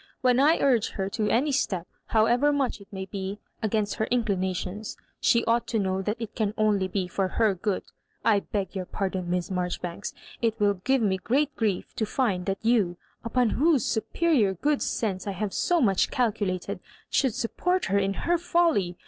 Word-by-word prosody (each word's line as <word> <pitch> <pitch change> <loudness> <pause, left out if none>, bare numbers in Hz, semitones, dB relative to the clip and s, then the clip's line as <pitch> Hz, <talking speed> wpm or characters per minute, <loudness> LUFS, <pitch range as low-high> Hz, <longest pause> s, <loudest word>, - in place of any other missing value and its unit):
When 250 -1 +4
I 305 +4 +5
urge 245 -6 +2
her 195 -2 -2
to 210 0 0
any 280 +6 +2
step, 190 -10 0 0.2
however 240 +6 +3
much 275 -7 -1
it 200 - -14
may 190 -1 -5
be 195 0 -5 0.2
against 215 -2 0
her 220 - +1
inclinations, 200 -3 -1 0.2
she 235 0 +3
ought 235 0 +1
to 230 - -1
know 190 -2 0
that 210 +4 -2
it 230 -2 -5
can 215 -2 -1
only 210 -3 +2
be 185 0 -2
for 190 +1 -1
her 215 +2 +2
good. 190 +1 -2 0.4
I 210 -3 +5
beg 200 0 -4
your 185 -1 -3
pardon. 190 -2 -3
Miss 180 0 -1
Marjoribanks. 180 +1 -3 0.3
It 225 -1 0
will 205 -1 +4
give 240 +7 +1
me 190 -3 +2
great 275 +8 0
grief 210 -5 -1
to 220 - 0
find 205 -8 0
that 195 +2 -2
you, 210 -7 +2 0.3
upon 235 0 +1
whose 300 -4 +3
superior 225 - +1
good 290 - 0
sense 195 -4 -2
I 200 - -1
have 195 +1 -3
so 350 -1 +2
much 195 - +3
calculated, 210 -8 -1
• - - -38 0.3
should 265 -5 +2
support 360 +10 0
her 200 0 +2
in 195 0 0
her 345 0 +2
folly. 325 - +1
210 Hz, 190 wpm, -27 LUFS, 190-245 Hz, 0.4 s, I